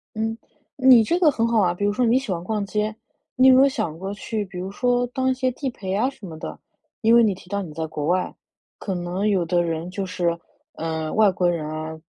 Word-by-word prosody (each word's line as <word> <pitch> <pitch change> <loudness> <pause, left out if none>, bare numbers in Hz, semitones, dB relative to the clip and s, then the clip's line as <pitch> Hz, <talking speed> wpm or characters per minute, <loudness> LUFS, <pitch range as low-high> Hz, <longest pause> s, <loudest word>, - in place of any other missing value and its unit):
嗯， 225 +1 -2 0.4
你 260 -4 +7
这 340 +10 0
个 340 -4 +5
很 230 -5 0
好 230 -2 +3
啊。 175 -2 +2
比 205 +3 -2
如 205 - +2
说 250 +2 +1
你 235 +3 +4
喜 265 -7 -3
欢 170 -1 -3
逛 210 0 -2
街， 210 +2 -2 0.4
你 255 +1 +5
有 260 - +8
没 260 - +7
有 275 - +5
想 215 - -3
过 195 +3 -5
去 210 +1 -3
比 190 -1 -10
如 190 +2 -5
说 245 +2 +1
当 260 +2 -1
一 260 - +3
些 255 0 0
地 265 +2 -4
陪 190 -6 -5
啊 230 +7 +1
什 240 -7 -12
么 160 -3 -8
的？ - - -7 0.4
因 225 +1 +4
为 235 - +7
你 210 -3 +3
提 180 0 -16
到 200 0 -1
你 165 -5 -8
在 160 +1 -3
国 150 -1 -4
外， 180 +2 0 0.5
可 195 - -3
能 180 +4 -2
有 190 -4 +2
的 175 +1 +2
人 165 +1 -3
就 195 +1 -3
是 175 -2 -1 0.4
呃， 160 -1 -3
外 215 -3 +5
国 180 -1 +1
人 160 -3 -2
啊， 155 0 -6
200 Hz, 270 characters per minute, -23 LUFS, 175-235 Hz, 0.5 s, 有